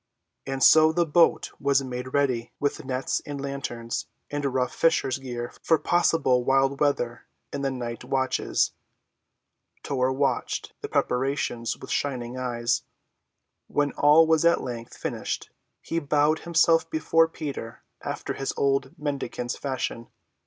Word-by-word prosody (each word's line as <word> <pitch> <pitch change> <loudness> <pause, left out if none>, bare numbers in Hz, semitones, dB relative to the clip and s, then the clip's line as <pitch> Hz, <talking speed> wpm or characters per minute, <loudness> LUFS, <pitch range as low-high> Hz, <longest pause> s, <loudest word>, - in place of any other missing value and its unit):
And 135 0 -1
so 155 0 +7
the 170 +1 +2
boat 165 +2 +3
was 140 -1 +2
made 125 0 -5
ready, 130 -5 0
with 145 - -1
nets 130 0 -1
and 145 -1 -6
lanterns, 135 -4 -4 0.2
and 145 0 -2
rough 130 -2 0
fisher's 160 -6 +2
gear 120 -2 -5
for 160 - +3
possible 160 -7 +2
wild 135 +1 +2
weather 120 -5 0 0.3
in 140 - -3
the 135 - 0
night 120 -3 -5
watches. 130 -1 0 1.1
Tor 130 -2 0
watched 135 -1 -1
the - - -5
preparations 125 -2 0
with - - -9
shining 125 -3 -2
eyes. 120 -2 -1 0.9
When 145 -1 +1
all 150 +3 +6
was 160 0 +3
at 170 0 +4
length 120 -2 -6
finished - - -4 0.3
he 165 - -1
bowed 150 +1 +2
himself 165 0 +4
before 165 +1 +3
Peter 140 -8 -6 0.2
after - - -4
his 135 - -3
old 135 +3 0
mendicant's 135 -4 -3
fashion. 130 -3 -3
135 Hz, 135 wpm, -26 LUFS, 125-150 Hz, 1.1 s, so